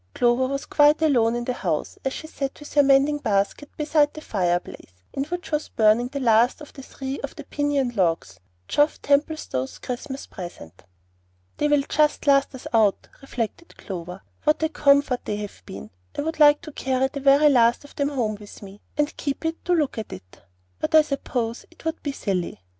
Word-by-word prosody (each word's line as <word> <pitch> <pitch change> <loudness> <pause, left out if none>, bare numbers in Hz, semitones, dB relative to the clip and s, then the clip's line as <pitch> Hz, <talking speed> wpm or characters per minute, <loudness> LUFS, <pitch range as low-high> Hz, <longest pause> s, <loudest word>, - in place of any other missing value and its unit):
Clover 245 +1 +3
was 275 +1 -3
quite 295 0 +4
alone 240 -7 +3
in 240 0 -3
the 250 - -1
house, - - -3
as 270 - -1
she 315 - -7
sat 275 -3 -5
with 295 - -11
her 290 - +6
mending 280 +2 +4
basket 210 +4 -1
beside 295 -1 +2
the 310 - -7
fireplace, 175 - -2 0.2
in 275 - -2
which 355 +3 -6
was 300 0 -1
burning 220 +2 +3
the 280 +2 -5
last 235 -1 +3
but 300 - -12
three 270 +1 -6
of 280 - -6
the 295 - -8
piñon 280 -4 -1
logs, 165 - 0 0.3
Geoff 295 +1 +2
Templestowe's 285 - 0
Christmas 265 +2 -6
present. 95 - -10 0.7
"They 295 - +1
will 295 -1 +3
just 300 -1 +1
last 275 -1 +3
us 255 - -11
out," 215 -3 +2
reflected 270 +5 -5
Clover; 180 -1 -7 0.2
"what 305 +1 +2
a 315 - +2
comfort 280 -4 +3
they 210 - -2
have 205 - -7
been! 100 +2 -9 0.3
I - - 0
would 320 +1 -4
like 295 -1 +6
to 310 - -8
carry 265 -1 0
the 280 - -6
very 280 +2 +5
last 240 -2 +4
of 285 - -16
them 280 0 0
home 230 -7 -1
with 205 0 -12
me, 200 +1 -12 0.2
and 295 0 0
keep 285 +2 -3
it 325 0 -3
to 360 - +2
look 300 -8 0
at; 215 - -7 0.7
but 315 +1 0
I 310 - +8
suppose 250 -5 -3
it 335 - -20
would 320 0 -2
be 285 - -2
silly." 190 - -3
275 Hz, 190 wpm, -24 LUFS, 225-295 Hz, 0.7 s, I